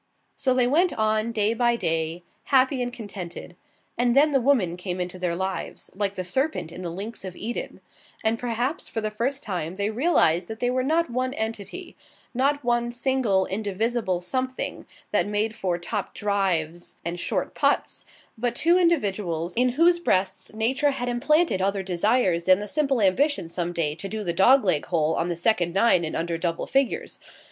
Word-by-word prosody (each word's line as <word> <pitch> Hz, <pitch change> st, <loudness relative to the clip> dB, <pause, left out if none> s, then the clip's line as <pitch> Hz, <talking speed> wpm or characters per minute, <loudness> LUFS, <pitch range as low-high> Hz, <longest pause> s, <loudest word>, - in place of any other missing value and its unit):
So 260 Hz, -2 st, +1 dB
they 250 Hz, -1 st, +3 dB
went 335 Hz, +8 st, +3 dB
on, 215 Hz, +1 st, +1 dB
day 215 Hz, -1 st, +1 dB
by 240 Hz, 0 st, +2 dB
day, 165 Hz, -3 st, -1 dB, 0.2 s
happy 260 Hz, -1 st, +3 dB
and 245 Hz, 0 st, -2 dB
contented. 190 Hz, -7 st, -7 dB, 0.4 s
And 245 Hz, 0 st, +3 dB
then 295 Hz, +2 st, +5 dB
the 270 Hz, -2 st, +3 dB
Woman 235 Hz, -10 st, +2 dB
came 180 Hz, 0 st, -4 dB
into 180 Hz, 0 st, -4 dB
their 175 Hz, -2 st, -1 dB
lives, 190 Hz, +1 st, -4 dB
like 200 Hz, 0 st, -2 dB
the 185 Hz, -, -3 dB
Serpent 180 Hz, -, -1 dB
in 180 Hz, -, -8 dB
the 175 Hz, -, -4 dB
Links 200 Hz, +7 st, -6 dB
of 185 Hz, -2 st, -7 dB
Eden, 235 Hz, +3 st, -5 dB, 0.4 s
and 225 Hz, +1 st, +1 dB
perhaps 245 Hz, +4 st, -2 dB
for 225 Hz, -, -4 dB
the 215 Hz, -1 st, -2 dB
first 265 Hz, +6 st, -2 dB
time 180 Hz, -4 st, -4 dB
they 200 Hz, +2 st, -1 dB
realized 215 Hz, -, +2 dB
that 220 Hz, 0 st, -7 dB
they 245 Hz, 0 st, +1 dB
were 255 Hz, 0 st, +1 dB
not 315 Hz, +2 st, +1 dB
one 255 Hz, +2 st, -1 dB
entity 225 Hz, -, -5 dB, 0.4 s
not 280 Hz, +3 st, +1 dB
one 240 Hz, 0 st, +1 dB
single, 240 Hz, -6 st, +1 dB
indivisible 205 Hz, -1 st, -1 dB
Something 255 Hz, +8 st, -3 dB, 0.2 s
that -, -, +2 dB
made 210 Hz, +1 st, 0 dB
for 180 Hz, -5 st, -1 dB
topped 195 Hz, +3 st, -4 dB
drives 180 Hz, -5 st, -1 dB
and 170 Hz, +1 st, -3 dB
short -, -, -2 dB
putts -, -, 0 dB, 0.3 s
but 240 Hz, +1 st, -2 dB
two 340 Hz, +7 st, +3 dB
individuals, 195 Hz, -, 0 dB
in 250 Hz, +1 st, +3 dB
whose 340 Hz, +5 st, +4 dB
breasts 190 Hz, -, 0 dB
Nature 260 Hz, +6 st, +2 dB
had 245 Hz, -3 st, -2 dB
implanted 285 Hz, -, +2 dB
other 195 Hz, 0 st, 0 dB
desires 185 Hz, -1 st, +1 dB
than 185 Hz, 0 st, +6 dB
the 205 Hz, +1 st, -5 dB
simple 275 Hz, -2 st, +1 dB
ambition 210 Hz, -, +2 dB
some 175 Hz, 0 st, -2 dB
day 165 Hz, -4 st, 0 dB
to 180 Hz, +5 st, -7 dB
do 215 Hz, +1 st, -4 dB
the 175 Hz, -3 st, -1 dB
dog 250 Hz, +8 st, +5 dB
leg 165 Hz, -6 st, +2 dB
hole 160 Hz, -3 st, +1 dB
on 165 Hz, -, 0 dB
the 175 Hz, -, -2 dB
second 175 Hz, -1 st, +1 dB
nine 195 Hz, -4 st, +4 dB
in 155 Hz, -, -3 dB
under 165 Hz, 0 st, -2 dB
double 170 Hz, -1 st, -2 dB
figures. 275 Hz, -, -1 dB
215 Hz, 185 wpm, -25 LUFS, 180-255 Hz, 0.4 s, than